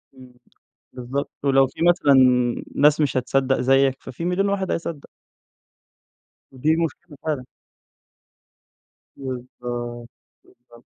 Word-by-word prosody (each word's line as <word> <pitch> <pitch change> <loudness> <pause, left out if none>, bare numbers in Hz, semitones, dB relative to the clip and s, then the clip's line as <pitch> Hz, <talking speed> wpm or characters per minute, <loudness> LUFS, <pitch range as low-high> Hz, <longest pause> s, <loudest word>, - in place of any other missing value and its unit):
امم، 130 -1 -15 0.6
بالضبط، 130 +3 -4
ولو 135 -1 +4
في 135 - -13
مثلًا 175 -5 +4 0.6
ناس 150 +2 +4
مش 145 -3 +1
هتصدق 135 +1 +1
زيك، 135 +1 +2
ففي 165 +7 -7
مليون 185 +3 +1
واحد 195 -1 -1
هيصدق. 165 -3 -4 1.4
ودي 150 +5 +1
مشكلة 160 -1 -10
فعلًا. 145 -5 -2 1.7
بالضبط، 120 -2 -6 0.3
بالضبط. 120 -1 -21
135 Hz, 100 wpm, -22 LUFS, 125-155 Hz, 1.7 s, ولو